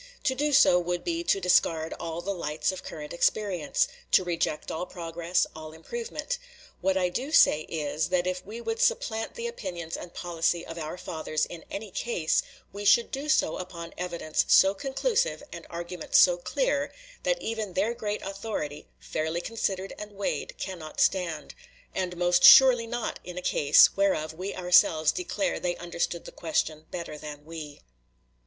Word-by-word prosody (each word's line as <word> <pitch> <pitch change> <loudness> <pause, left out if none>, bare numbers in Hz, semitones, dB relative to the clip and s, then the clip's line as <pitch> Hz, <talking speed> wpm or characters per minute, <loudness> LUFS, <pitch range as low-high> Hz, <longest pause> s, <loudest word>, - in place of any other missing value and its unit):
To 260 - +2
do 295 +3 0
so 180 -9 +6
would 175 0 -2
be 335 0 -2
to 195 - +2
discard 165 -3 +2
all 165 0 -4
the 200 +3 -2
lights 160 -1 -1
of 185 0 -8
current 150 -1 -7
experience 180 -3 +1 0.3
to 185 - +6
reject 170 -3 -2
all 175 +3 -3
progress, 170 0 -1
all 155 0 -9
improvement. 475 - -5 0.4
What 190 0 +1
I 180 -1 +2
do 260 +11 -4
say 155 - +5
is, 155 -1 -2
that 180 -1 +1
if 185 0 -2
we 220 +4 -8
would 450 - -3
supplant 255 - 0
the 470 - -5
opinions 175 - -5
and 175 - -8
policy 170 0 -1
of 165 0 -7
our 155 +2 -5
fathers 155 -2 -2
in 170 -2 -10
any 205 0 -6
case, 180 -9 0 0.3
we 205 +1 -6
should 230 +3 +4
do 280 +3 -4
so 230 - +2
upon 175 -2 -7
evidence 170 -3 -1
so 190 +1 +6
conclusive, 435 - -1
and - - -9
argument 170 0 -6
so 180 - +7
clear, - - -1 0.3
that - - 0
even 220 - -4
their 205 +6 +1
great 210 -3 -4
authority, 195 -7 -5
fairly 160 +2 -2
considered 195 -1 -3
and 210 0 -8
weighed, 200 0 -3
cannot 170 -5 -6
stand; 170 -5 0 0.4
and 180 -2 -3
most 175 0 +2
surely 250 -3 +9
not 240 0 -3
in 180 0 -8
a - - -3
case, 145 0 +5
whereof 190 -6 +1
we 185 +5 -5
ourselves 170 -3 +4
declare 325 -5 -2
they 175 -1 -1
understood 170 0 -3
the - - -8
question 155 -1 -2
better 170 -3 -6
than 150 -1 -9
we. 155 -3 -8
180 Hz, 170 wpm, -27 LUFS, 165-215 Hz, 0.4 s, surely